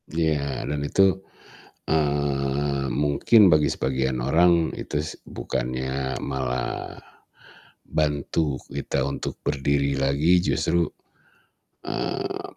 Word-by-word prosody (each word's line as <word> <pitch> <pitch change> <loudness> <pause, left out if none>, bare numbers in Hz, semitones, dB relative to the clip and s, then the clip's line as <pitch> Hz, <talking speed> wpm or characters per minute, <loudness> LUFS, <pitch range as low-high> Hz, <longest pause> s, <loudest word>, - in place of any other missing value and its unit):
Iya, 75 -4 -1
dan 75 0 -1
itu, 95 - +2 0.9
eee, 70 -2 0 0.2
mungkin 75 +10 +4
bagi 75 -2 +3
sebagian 65 0 -1
orang, 85 +3 +3
itu - - -6
s 80 - -5
bukannya 65 +2 -3
malah 65 -2 -3 0.9
bantu 75 -1 0
kita 70 0 -2
untuk - - -4
berdiri 70 0 +1
lagi, 75 +6 +3
justru, 85 0 +1 1.0
eee, - - -3
70 Hz, 90 wpm, -24 LUFS, 70-75 Hz, 1.0 s, mungkin